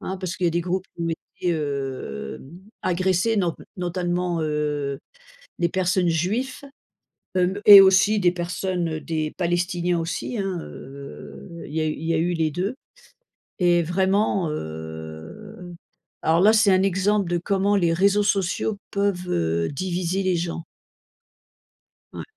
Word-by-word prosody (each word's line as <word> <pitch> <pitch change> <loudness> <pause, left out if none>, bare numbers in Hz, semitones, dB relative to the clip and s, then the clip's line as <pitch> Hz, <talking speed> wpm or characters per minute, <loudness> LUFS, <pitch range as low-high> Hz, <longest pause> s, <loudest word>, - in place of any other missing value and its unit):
hein, 190 - -4
parce 185 -1 -4
qu'il 185 - -2
y - - +4
a - - 0
des 170 +1 0
groupes 185 +2 -2
qui 170 - -6
ont 165 - -1
été, 170 +1 -3
heu, 135 - -4 0.4
agressés 185 +4 +1
not 175 -5 +1 0.2
notamment, 175 -1 -1
heu, 150 -2 -2 0.6
des 170 -1 +2
personnes 185 0 +1
juifs 215 - -1 0.7
hem 185 +2 +1
et 205 -1 +12
aussi 195 +3 +5
des 175 -2 +3
personnes, 180 0 -2
heu, 155 -1 -4
des 155 -1 -3
palestiniens 175 0 0
aussi 175 +8 -3
hein, 195 -3 -2
heu, 140 +5 -10
il - - -11
y 160 - 0
a 155 - 0
eu - - -1
il 155 - -8
y 165 - +1
a - - +2
eu 175 +2 +1
les 160 -2 +1
deux 185 - -2 0.8
et 175 -1 +3
vraiment 190 0 +1
heu, 80 - -8 0.5
alors 165 +1 +3
là 210 +4 +6
c'est 215 -3 +4
un 185 0 +4
exemple 195 0 +1
de 175 - +1
comment 195 +3 +1
les 170 -4 +2
réseaux 200 +4 +3
sociaux 200 +2 0 0.2
peuvent, 200 -3 -1
heu, 85 0 0
diviser 180 +4 -2
les 185 -1 +2
gens. 170 -1 -3 1.5
Ouais. - - -6
175 Hz, 155 wpm, -23 LUFS, 160-190 Hz, 1.5 s, et